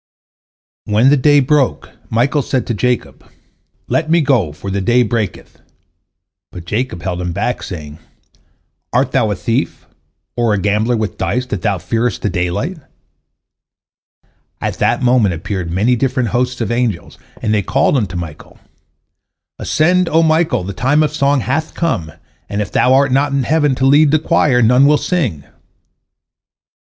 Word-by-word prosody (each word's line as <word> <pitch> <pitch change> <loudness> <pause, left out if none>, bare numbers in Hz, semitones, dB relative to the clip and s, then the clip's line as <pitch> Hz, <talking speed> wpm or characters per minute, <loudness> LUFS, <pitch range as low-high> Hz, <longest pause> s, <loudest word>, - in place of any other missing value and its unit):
When 110 +5 +3
the - - +6
day 145 +1 +4
broke, 140 0 0 0.2
Michael 130 +6 +1
said 130 -1 -2
to 115 - -2
Jacob, 125 +3 -2 0.6
"Let 155 - -1
me 170 +1 +4
go, 125 - +1
for 95 +6 -7
the 100 0 -1
day 120 +5 +3
breaketh," 110 -3 -4 0.9
but 85 -2 -10
Jacob 105 -2 -3
held 90 -1 -3
him 90 -1 -3
back, 105 +6 -2
saying, 75 -4 -8 0.9
"Art - - +1
thou - - +1
a - - -1
thief, - - -2 0.5
or 115 -3 +1
a - - -1
gambler 105 +5 0
with 110 -1 -4
dice, 125 +1 -1
that 105 -7 -4
thou 100 -3 0
fearest 115 +3 -2
the 105 - 0
daylight?" 90 - -2 1.8
At - - -4
that - - +1
moment 120 -7 +3
appeared 85 +1 -4
many 105 +9 +1
different 125 -1 -1
hosts 125 +2 -1
of 115 - -2
angels, 120 -7 -2 0.2
and 110 - -1
they 105 - +2
called 135 +8 +1
unto 100 -8 -1
Michael: 85 -3 -8 1.0
"Ascend, 180 +3 +1
O 165 +1 +3
Michael, 160 - +1
the 100 +2 -5
time 145 +9 +2
of 150 -1 -1
song 140 -2 +1
hath 140 +7 -2
come, 90 - -2 0.4
and 100 - -3
if 105 -3 -3
thou 125 - +2
art 140 0 +3
not 140 +2 +1
in 140 -1 +1
heaven 145 0 +1
to 130 - 0
lead 145 +2 +5
the 155 - +4
choir, 130 -5 +2
none 125 +5 +5
will 150 0 +4
sing." 130 - -2
125 Hz, 160 wpm, -16 LUFS, 100-140 Hz, 1.8 s, the